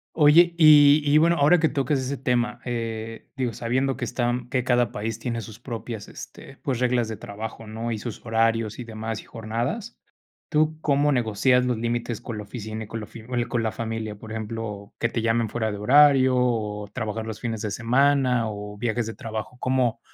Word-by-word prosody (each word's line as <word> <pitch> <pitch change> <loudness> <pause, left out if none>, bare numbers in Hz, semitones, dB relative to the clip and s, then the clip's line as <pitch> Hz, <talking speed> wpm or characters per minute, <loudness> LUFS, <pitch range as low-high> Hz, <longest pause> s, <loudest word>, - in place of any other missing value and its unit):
Oye, 170 +3 +6
y 150 -1 +8
y 145 +1 +4
bueno, 170 +2 +4
ahora 150 +5 +5
que 160 - +3
tocas 140 0 0
ese 130 +2 -3
tema, 125 -2 0
eh, 115 -2 -4
digo, 130 -3 -1
sabiendo 130 +4 -1
que - - -2
están 120 0 -1
que 130 -2 0
cada 120 -2 +2
país 110 +1 -4
tiene 115 0 -3
sus 110 -1 -10
propias, 115 -3 -6
este, 135 - -11
pues, 130 -4 -3
reglas 125 -2 +1
de 110 -1 -5
trabajo, 110 +2 -7
¿no?, 115 +2 -4
y 110 - -2
sus 110 +1 -7
horarios 115 -1 +1
y 125 - -5
demás, 110 -1 -5
y - - -19
jornadas. 120 - -4 0.5
¿Tú 155 0 +2
cómo 145 0 +2
negocias 125 +1 +2
los 125 -2 0
límites 120 0 -2
con 115 -3 -6
la 105 - -5
oficina 110 0 -6
y 105 - -10
con 115 - -5
lo 105 - -7
film 110 0 -12 0.2
con 120 -1 -1
la 110 - 0
familia? 110 -2 -4
Por 110 +2 -12
ejemplo, 110 -2 -5
que 115 - +1
te 115 - -2
llamen 115 -1 +1
fuera 110 -1 -1
de 105 - -5
horario 130 +2 +6
o 105 -4 0
trabajar 110 -2 -3
los 110 -1 -6
fines 115 -3 -4
de 105 - -2
semana, 125 +1 +2
o 105 0 -7
viajes 115 +1 -1
de 115 - -6
trabajo. 110 +2 -6
¿Cómo 125 -3 +1
115 Hz, 200 wpm, -24 LUFS, 110-130 Hz, 0.5 s, y